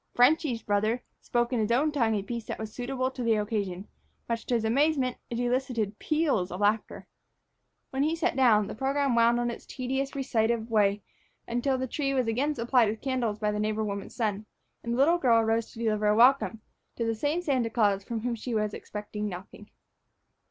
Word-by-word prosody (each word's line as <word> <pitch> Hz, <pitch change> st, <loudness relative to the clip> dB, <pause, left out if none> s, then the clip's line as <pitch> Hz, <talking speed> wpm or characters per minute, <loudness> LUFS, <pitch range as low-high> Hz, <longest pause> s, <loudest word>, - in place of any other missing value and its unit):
"Frenchy's" 250 Hz, -1 st, +3 dB
brother 215 Hz, +4 st, 0 dB, 0.2 s
spoke 240 Hz, +1 st, 0 dB
in 245 Hz, -, +1 dB
his 215 Hz, +1 st, 0 dB
own 285 Hz, +6 st, +3 dB
tongue 230 Hz, -7 st, +1 dB
a 200 Hz, -, -1 dB
piece 235 Hz, +1 st, -5 dB
that -, -, -5 dB
was 220 Hz, -1 st, -6 dB
suitable 255 Hz, +1 st, -2 dB
to 260 Hz, -, -7 dB
the 230 Hz, -2 st, +2 dB
occasion; 205 Hz, -3 st, -2 dB, 0.4 s
much 230 Hz, -1 st, -3 dB
to 245 Hz, -, +1 dB
his 225 Hz, -1 st, 0 dB
amazement, 270 Hz, +1 st, +2 dB
it 235 Hz, -, -3 dB
elicited 245 Hz, -4 st, -1 dB
peals 300 Hz, -, +1 dB
of 180 Hz, -, -5 dB
laughter. 210 Hz, +1 st, 0 dB, 0.9 s
When 265 Hz, -, -1 dB
he 310 Hz, +3 st, +2 dB
sat 330 Hz, -5 st, 0 dB
down, 230 Hz, -6 st, +4 dB
the -, -, -6 dB
program 275 Hz, +2 st, 0 dB
wound 235 Hz, 0 st, +4 dB
on 240 Hz, 0 st, 0 dB
its -, -, -9 dB
tedious, 265 Hz, +2 st, -3 dB
recitative 230 Hz, -4 st, 0 dB
way 205 Hz, -2 st, +2 dB, 0.4 s
until 245 Hz, +3 st, 0 dB
the 260 Hz, -, -2 dB
tree 275 Hz, +2 st, -2 dB
was 255 Hz, -2 st, +2 dB
again 265 Hz, +7 st, 0 dB
supplied 240 Hz, -2 st, +3 dB
with 215 Hz, +1 st, -4 dB
candles 250 Hz, -6 st, -1 dB
by 210 Hz, -1 st, 0 dB
the 210 Hz, -, -2 dB
neighbor 215 Hz, +1 st, 0 dB
woman's 200 Hz, -1 st, -5 dB
son, 215 Hz, -3 st, -2 dB, 0.4 s
and 235 Hz, -, -2 dB
the -, -, -1 dB
little 330 Hz, +6 st, +4 dB
girl 235 Hz, -6 st, +4 dB
arose 225 Hz, 0 st, 0 dB
to -, -, -14 dB
deliver 215 Hz, -1 st, +1 dB
a 210 Hz, -, +4 dB
welcome 240 Hz, -1 st, +4 dB, 0.3 s
to 230 Hz, -, -2 dB
that 225 Hz, -, +1 dB
same 295 Hz, +10 st, -1 dB
Santa 260 Hz, -8 st, +1 dB
Claus 205 Hz, -4 st, +2 dB
from 225 Hz, +1 st, -4 dB
whom 245 Hz, +1 st, -1 dB
she 230 Hz, 0 st, -3 dB
expected 210 Hz, 0 st, -4 dB
nothing. 205 Hz, +1 st, -6 dB
235 Hz, 200 wpm, -28 LUFS, 215-260 Hz, 0.9 s, down